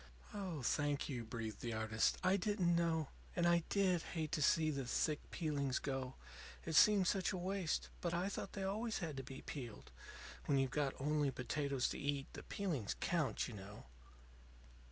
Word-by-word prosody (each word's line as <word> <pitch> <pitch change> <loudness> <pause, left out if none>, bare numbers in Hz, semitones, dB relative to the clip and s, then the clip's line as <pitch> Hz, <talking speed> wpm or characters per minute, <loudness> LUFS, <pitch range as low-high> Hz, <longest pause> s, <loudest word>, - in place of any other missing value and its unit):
"Oh, 185 -9 -3
thank 145 +3 +1
you," 125 -4 -2
breathed 110 -2 -5
the 120 -1 -2
artist. 110 0 +2
"I 185 +1 +5
didn't 190 -3 +2
know. 165 -3 +1 0.3
And 175 - +2
I 170 0 +5
did 185 -4 +3
hate 160 -3 -3
to 155 - 0
see 155 +1 +4
the 135 -4 -3
thick 150 +4 +1
peeling 145 -5 -1
go; 130 -2 -2 0.5
it 160 - -2
seemed 200 +3 +7
such 190 0 +2
a 190 - -2
waste. 185 -1 -1
But 170 - 0
I 175 +3 0
thought 200 - -4
they 195 - -3
always 215 +4 -1
had 160 -5 -3
to 135 - -3
be 135 +1 -8
peeled. 120 -7 -7 0.6
When 140 - +4
you've 135 -1 +2
got 140 -2 0
only 150 +1 +2
potatoes 135 +1 0
to - - -4
eat, 140 -1 -1
the - - -6
peelings 160 - -2
count, 165 -5 +1
you 120 - -7
know." 100 0 -9
150 Hz, 180 wpm, -39 LUFS, 135-175 Hz, 0.6 s, seemed